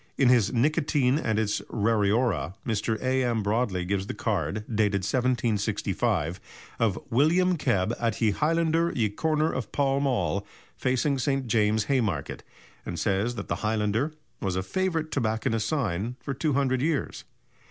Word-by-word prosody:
In 130 -3 +4
his 120 -5 +4
"Nicotine 145 +1 +2
and 110 -8 -1
its 105 -1 0
Rariora," 105 - +1
Mr. 110 -1 -1
A.M. 130 -4 +1
Broadley 100 -4 0
gives 100 0 -1
the - - -4
card, 105 -1 -2
dated 105 -3 +1
1765, 110 - 0 0.4
of 110 -4 +2
"William 170 +9 +3
Kebb, 100 - +1
at 115 -1 -1
ye 110 -3 +3
Highlander 165 +5 +1
ye 110 -4 +1
corner 155 +7 0
of 130 -3 -4
Pall 140 -1 +1
Mall, 100 - 0 0.3
facing 130 +2 0
St. 135 0 0
James's, 110 -2 +2
Haymarket," 110 - -1 0.4
and 85 - -5
says 105 +6 0
that 100 - -6
the - - -1
highlander 110 +6 0 0.3
was 95 -2 -1
a 95 - -1
favourite 165 - -1
tobacconist's 110 -3 0
sign 115 - -1
for 140 - -4
200 135 -3 +1
years. 155 -1 -1
115 Hz, 140 wpm, -27 LUFS, 105-135 Hz, 0.4 s, In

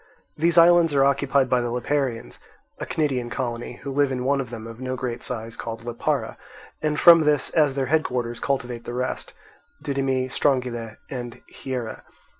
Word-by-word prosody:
These 170 +2 +1
islands 170 -2 +6
are 135 0 +5
occupied 140 -1 +2
by 125 -1 +2
the 120 - -2
Liparaeans, 125 0 -2 0.4
a - - -5
Cnidian 130 -6 -1
colony, 120 -2 -4
who 140 - -4
live 140 0 +2
in 125 -1 -2
one 140 +1 +2
of 125 - -7
them 115 -2 -7
of 115 +2 -10
no 130 0 -3
great 125 -2 -4
size 115 -2 -5
called 115 0 -6
Lipara; 120 -1 -2 0.4
and 150 -1 0
from 170 -2 +9
this 150 -3 +1
as 150 -4 +3
their 135 -1 0
headquarters 125 -5 -1
cultivate 125 -4 -2
the 120 - -5
rest, 125 +1 -3 0.5
Didyme, 135 -2 0
Strongyle, 125 -6 0
and 120 -3 -6
Hiera. 125 -4 -6
130 Hz, 170 wpm, -24 LUFS, 120-140 Hz, 0.5 s, from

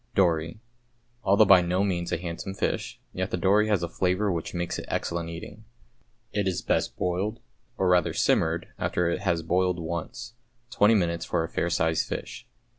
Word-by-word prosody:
=Dory.= 85 0 +2 0.6
Although 100 +3 +5
by 95 -2 +7
no 90 +2 +1
means 85 -3 -1
a - - +1
handsome 85 +3 -5
fish, - - -2
yet 95 +1 -2
the - - -1
dory 100 +4 +3
has 100 -5 +1
a - - 0
flavour 95 +4 0
which 85 -2 -3
makes 85 0 -2
it - - -7
excellent 85 -1 -2
eating. 100 +6 -9 0.7
It 105 -2 0
is 95 - -1
best - - 0
boiled, 95 +6 -1 0.4
or 95 - +1
rather 90 -2 +3
simmered, 80 +1 +1
after 90 -1 0
it - - -1
has 85 -1 0
boiled 90 +2 +1
once, 85 +7 -5 0.4
twenty 110 -3 +4
minutes 85 -4 0
for 85 -2 0
a - - -3
fair 85 - -1
sized 80 -1 +1
fish. - - -6
90 Hz, 180 wpm, -27 LUFS, 85-95 Hz, 0.7 s, by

